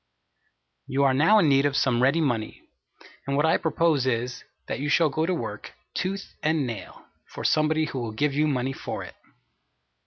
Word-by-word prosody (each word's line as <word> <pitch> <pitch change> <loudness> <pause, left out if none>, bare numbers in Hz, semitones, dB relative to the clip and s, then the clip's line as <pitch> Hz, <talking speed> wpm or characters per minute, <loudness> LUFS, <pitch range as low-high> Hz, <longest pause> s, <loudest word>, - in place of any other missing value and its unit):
You 135 +2 +1
are 135 -1 +4
now 160 +11 +5
in 185 -7 +4
need 140 0 +4
of 140 - -1
some 125 -2 +2
ready 140 +6 +3
money; 120 -7 -2 0.6
and 140 0 0
what 145 - +3
I 160 - +4
propose 160 -4 +1
is, 125 0 -2 0.2
that - - -4
you 145 +2 -2
shall 160 +1 +4
go 155 +4 0
to 185 - +1
work, - - -6 0.2
"tooth 195 +2 -4
and 155 -2 +1
nail," 115 -6 -8 0.2
for - - -8
somebody 155 +1 +2
who 135 - -5
will 115 -2 -4
give 140 +6 0
you 150 +2 +2
money 135 -2 -1
for - - -6
it. - - -10
140 Hz, 190 wpm, -25 LUFS, 130-160 Hz, 0.6 s, now